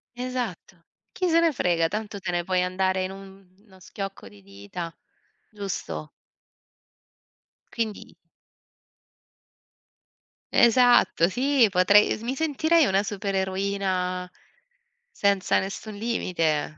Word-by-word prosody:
Esatto, 245 -8 -5 0.3
chi 365 - -1
se 335 -1 +4
ne 335 -1 +3
frega 170 - +1
tanto 210 +1 -5
te 180 - -5
ne 175 -1 0
puoi 185 +1 0
andare 185 +1 0
in 185 - -3
uno 195 0 -15
schiocco 195 - -7
di 100 -1 -18
dita, 100 - -8 0.6
giusto? 195 - -5 1.6
Quindi 220 -3 -4 2.4
Esatto 240 -7 +5
sì, 260 +1 +3
potrei 195 +3 +5
mi 250 +4 -3
sentirei 315 +1 +2
una 195 -2 +2
supereroina 190 -2 -2 0.8
senza 200 - +1
nessun 200 +2 -6
limite, 165 -9 -1
195 Hz, 95 wpm, -25 LUFS, 180-225 Hz, 2.4 s, Esatto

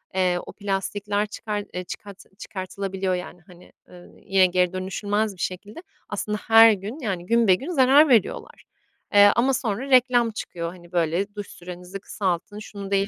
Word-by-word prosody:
eee, 180 -1 +1
o - - -10
plastikler 205 +1 -2
çıkar 210 0 -4
eee, 180 - -4
çıkart 200 +2 -9 0.2
çıkartılabiliyor. 190 -1 -4
Yani, 180 -1 -8
hani, 180 -1 -17 0.2
ııı, 175 -1 -16
ye 195 -1 +4
geri 180 0 +1
dönüşülmez 205 +3 -2
bir 175 - -10
şekilde 205 - -5 0.3
aslında 210 0 -3
her 225 0 +8
gün, 210 +9 -6
yani, 190 -8 -3
günbegün 230 - +2
zarar 280 0 +5
veriyorlar. 230 -7 +1 0.5
Eee, 205 0 +8
ama 260 +3 +2
sonra 245 +1 -2
reklam 245 -3 +4
çıkıyor, 170 -5 -5
hani, 175 -1 -15
böyle, 175 +4 -1
duş 205 -1 -6
sürenizi 180 +2 -9
kısaltın, 195 +1 -3
şunu 200 -2 -9
değil, 195 0 +2
200 Hz, 155 wpm, -24 LUFS, 185-220 Hz, 0.5 s, her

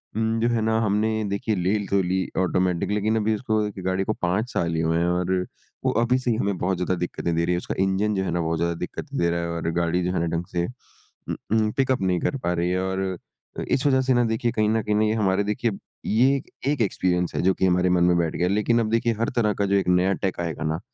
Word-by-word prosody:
उम, 115 0 0
जो 115 - +2
है 115 -1 +1
न 110 - +1
हमने 110 +1 +1
देखिए 105 +2 -1
ले 90 +3 +1
तो 100 -1 +2
ली 95 +1 0
ऑटोमैटिक 90 0 +1
लेकिन 105 +2 +1
अभी 110 0 +1
उसको 110 -1 0 0.2
गाड़ी 95 +1 0
को 110 - -1
5 95 +7 0
साल 85 -1 0
ही 80 - 0
हुए 80 0 +1
हैं 85 - +2
और 90 +1 0 0.5
वो - - +3
अभी 125 +2 +2
से 125 -2 0
ही 110 - 0
हमें 100 -5 -1
बहुत 90 +1 0
ज़्यादा 90 0 0
दिक्कतें 85 -1 -3
दे 85 0 +1
रही 90 - +1
है। - - +1
उसका - - -4
इंजन 100 +2 +1
जो 95 - 0
है 90 - -2
ना 85 0 0
बहुत 80 0 -1
ज़्यादा 85 0 0
दिक्कत - - -9
दे 85 - +1
रहा 85 - 0
है 85 - -3
और 85 0 -2
गाड़ी 85 +1 0
जो 90 - 0
है - - 0
ना 85 - 0
ढंग 85 - -4
से 85 0 +1
उ 125 - -11
उ 110 -1 0
पिक-अप 130 -4 +1
नहीं 90 -2 +1
कर 140 - -1
पा 90 -8 -2
रही 85 0 0
है 95 0 0
और 95 0 -2 0.6
अ, - - -2
इस 130 - +1
वज़ह 130 -1 +4
से 130 0 +2
ना 120 0 +3
देखिए 115 +1 0
कहीं 105 -1 +1
न 110 0 +2
कहीं 105 0 +1
हमारे 100 -2 +2
देखिए 110 +2 -1 0.3
ये 130 +5 +3 0.3
एक 140 -5 -1
एक्सपीरियंस 90 -3 0
है - - +1
जो 95 +2 +3
कि 95 - +1
हमारे 90 0 +2
मन 90 -1 +3
में 90 0 +4
बैठ 85 -2 0
गया 90 - +1
है। 95 - +1
लेकिन 115 +3 +2
अब 110 - 0
देखिए 115 0 +2
हर 115 +4 +1
तरह 105 -3 +2
का 100 - -1
जो 100 - +1
एक 95 -2 +1
नया 90 +2 +3
टेक 95 -3 -3
आएगा 80 -2 -3
ना 80 +2 -1
95 Hz, 270 wpm, -24 LUFS, 90-110 Hz, 0.6 s, वज़ह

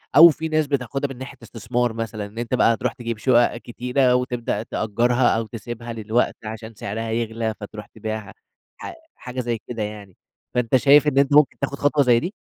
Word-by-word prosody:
أو 165 +3 +11
في 160 +1 -3
ناس 155 -1 +1
بتاخدها 135 0 -1
من - - -14
ناحية 130 +1 -9
إستثمار 115 +1 -2
مثلًا، 110 -2 -4
إن 105 +3 -13
أنت 120 +1 -4
بقى 115 -2 +4
تروح - - -2
تجيب 115 -3 -5
شُقق 120 0 +3
كتيرة، 125 +2 0
وتبدأ 120 -3 -1
تأجَّرها 120 +3 +1
أو 115 - -3
تسيبها 115 +1 -7
للوقت 115 +2 0
عشان 110 +1 -7
سعرها 110 +2 -4
يغلى، 115 -1 -2
فتروح 105 0 -8
تبيعها، 110 -1 -6 0.4
ح - - -7 0.2
حاجة 125 0 -7
زي 120 -2 -2
كده 115 -3 -3
يعني، 105 -3 -8 0.4
فانت 125 0 +1
شايف 145 +3 +6
إن 135 -2 +1
أنت 140 0 +4
ممكن 150 -2 +4
تاخد 140 0 -2
خطوة 145 0 +3
زي 120 -2 +4
دي؟ 180 - -4
120 Hz, 190 wpm, -22 LUFS, 110-130 Hz, 0.4 s, أو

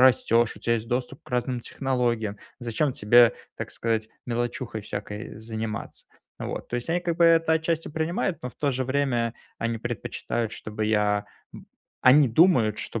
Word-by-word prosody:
растешь, 120 -2 +4
у - - -10
тя 115 - 0
есть 115 -1 -1
доступ 125 +2 -2
к - - -17
разным 125 0 -1
технологиям, 120 -5 -1 0.2
зачем 120 +4 0
тебе, 120 +2 +6 0.2
так - - -5
сказать, 110 -1 -1 0.2
мелочухой 120 -1 -2
всякой 105 +2 -6
заниматься." 110 -1 -5 0.3
Вот. - - -5
То 120 - -2
есть 120 +6 -4
они, 175 +2 +1
как 170 -2 -2
бы, 170 - +5
это 165 -1 +5
отчасти 160 0 -1
принимают, 165 +3 -1
но 125 - -4
в - - -21
то 145 - +1
же 130 0 -1
время 130 -3 0 0.2
они 115 0 -2
предпочитают, 120 0 -3
чтобы 110 0 -4
я 105 -1 +2 0.3
б - - -11 0.4
они 135 +2 +7
думают, 120 - +4
что 115 - -1
120 Hz, 170 wpm, -26 LUFS, 110-135 Hz, 0.4 s, они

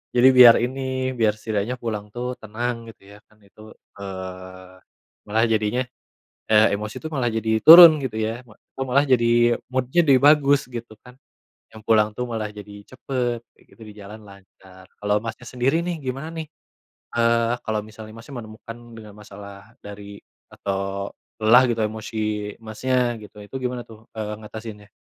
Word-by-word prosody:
Jadi 125 +2 +6
biar 125 -2 +9
ini 130 0 -3
biar 110 -2 +3
setidaknya 110 +2 -3
pulang 105 -3 -5
tuh 125 +1 -4
tenang 115 +2 -5
gitu - - -28
ya 105 - -14
kan 110 - -27
itu, 110 +2 -16 0.2
eee, 95 -1 -9 0.5
malah 110 +2 +1
jadinya, 110 +3 0 0.7
eee, 110 0 +5
emosi 105 +1 -4
tuh 160 - -4
malah 130 -4 0
jadi 110 0 -1
turun 165 +3 +10
gitu 130 -5 -5
ya, 110 +2 -3
ma 110 - -18 0.2
aku - - -11
malah 140 +3 +3
jadi 120 -2 +3
mood-nya 130 +5 0
jadi 135 - +7
bagus 145 -1 +5
gitu 120 -2 -7
kan. 125 +2 -16 0.5
Yang 110 - -12
pulang 105 -1 +3
tuh 125 +3 -4
malah 110 -2 -3
jadi 105 -1 -11
cepet 125 -2 -3 0.2
gitu, 115 - -20
di 105 - -12
jalan 105 +2 -11
lancar. 95 -1 -17
Kalau 105 0 0
Masnya 115 +1 -7
sendiri 130 +8 0
nih, 170 -4 -4
gimana 135 +4 -5
nih? 160 -1 -5 0.7
Eee, 115 0 +2
Kalau 110 -1 -2
misalnya, 110 0 -12
Masnya, 115 +5 -12
menemukan 110 +1 -11 0.2
dengan 105 -2 -12
masalah 100 0 -13
dari 100 0 -10 0.3
atau 100 0 -4 0.2
lelah 115 +3 +5
gitu 115 -1 -1
emosi, 110 +1 -7 0.4
Masnya, 120 +2 -1
gitu. 105 0 -14
Itu 120 - -13
gimana 125 -1 -4
tuh, 110 0 -17
eee, 105 -1 -4
ngatasinnya? 105 -1 -10
110 Hz, 160 wpm, -22 LUFS, 105-125 Hz, 0.7 s, turun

